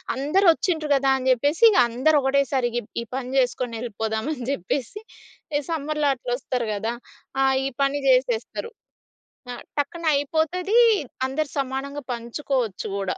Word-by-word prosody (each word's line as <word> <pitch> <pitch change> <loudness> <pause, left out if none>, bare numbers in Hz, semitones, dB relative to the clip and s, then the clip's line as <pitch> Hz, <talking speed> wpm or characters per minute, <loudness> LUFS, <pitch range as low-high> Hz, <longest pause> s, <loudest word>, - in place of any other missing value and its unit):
అందరూ 305 +9 +2
ఒచ్చిండ్రు 320 -6 -2
గదా 270 0 +2
అని 260 0 -1
చెప్పేసిగ 310 - +4
అందరు 290 +6 +3
ఒకటేసారి 270 -2 +1
గ్ - - +2 0.2
ఈ - - -4
పని 255 -1 -4
చేసుకొనెళ్ళిపోదామని 240 +1 -2
జెప్పేసి, 270 - -3 0.6
ఎ - - -4
సమ్మర్‌లో 300 -2 -1
అట్లొస్తారు 245 -1 -3
గదా! 220 +3 -2 0.5
ఆ! - - +4 0.2
ఈ - - 0
పని 275 +1 +1
జేసేస్తరు. 255 - +1 0.8
ఆ! - - -5 0.2
టక్కన 335 +4 -3
అయిపోతదీ, 330 +9 +1 0.5
అందరు 285 +2 -2
సమానంగా 275 +2 -3
పంచుకోవచ్చు 235 -2 -3
గూడా. 195 -2 -2
270 Hz, 125 wpm, -24 LUFS, 245-300 Hz, 0.8 s, చెప్పేసిగ